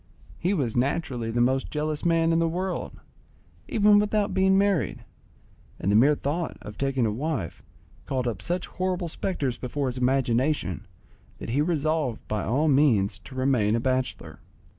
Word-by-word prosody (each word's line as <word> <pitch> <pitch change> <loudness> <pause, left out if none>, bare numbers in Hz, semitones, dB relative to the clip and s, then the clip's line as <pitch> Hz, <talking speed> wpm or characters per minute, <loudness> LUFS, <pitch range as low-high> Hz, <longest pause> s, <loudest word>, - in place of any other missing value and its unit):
He 185 +4 +1
was 125 - -1
naturally 125 -2 -1
the 120 +1 0
most 130 +2 +1
jealous 150 0 -2
man 165 -1 +3
in 165 - +3
the 165 - +2
world, 185 +2 -4 0.7
even 210 -1 +5
without 210 0 0
being 190 0 +4
married, 200 -5 +1 0.7
and 100 - 0
the - - +3
mere 140 +7 +5
thought 155 +5 -3
of 105 0 -9
taking 135 -3 0
a 110 - +1
wife 125 - -3 0.5
called 130 -2 -1
up 105 -6 -3
such 175 - -2
horrible 185 -1 -2
spectres 145 -7 -2
before 135 +3 -3
his 125 0 -5
imagination 125 - 0 0.5
that - - -6
he 140 +5 +2
resolved 155 -5 -1
by 105 -2 -2
all 140 +7 +1
means 115 -9 +3
to 130 - -13
remain 130 -5 +2
a - - +1
bachelor. 130 +1 -2
140 Hz, 160 wpm, -26 LUFS, 120-165 Hz, 0.7 s, even